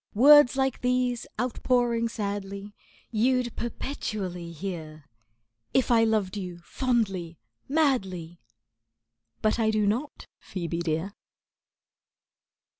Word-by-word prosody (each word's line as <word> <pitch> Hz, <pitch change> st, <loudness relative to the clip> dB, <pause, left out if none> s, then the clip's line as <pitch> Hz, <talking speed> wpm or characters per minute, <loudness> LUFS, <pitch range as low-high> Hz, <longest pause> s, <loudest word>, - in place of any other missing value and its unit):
Words 285 Hz, +2 st, +8 dB
like 265 Hz, -1 st, 0 dB
these, 250 Hz, -1 st, 0 dB
outpouring 240 Hz, -1 st, +1 dB
sadly, 200 Hz, -2 st, -4 dB, 0.4 s
You'd 245 Hz, +2 st, +1 dB
perpetually 200 Hz, -8 st, -4 dB
hear, 160 Hz, -3 st, -6 dB, 0.7 s
If 260 Hz, -1 st, +3 dB
I 225 Hz, -1 st, +5 dB
loved 215 Hz, -3 st, 0 dB
you 180 Hz, -4 st, -5 dB
fondly, 195 Hz, -10 st, -1 dB, 0.3 s
madly; 195 Hz, -, 0 dB, 1.0 s
But 215 Hz, +2 st, +2 dB
I 220 Hz, -1 st, +3 dB
do 215 Hz, -1 st, +2 dB
not, 245 Hz, +9 st, -2 dB, 0.2 s
Ph[oe]be 170 Hz, -2 st, -4 dB
dear. 170 Hz, +3 st, -2 dB
215 Hz, 95 wpm, -27 LUFS, 185-250 Hz, 1.0 s, Words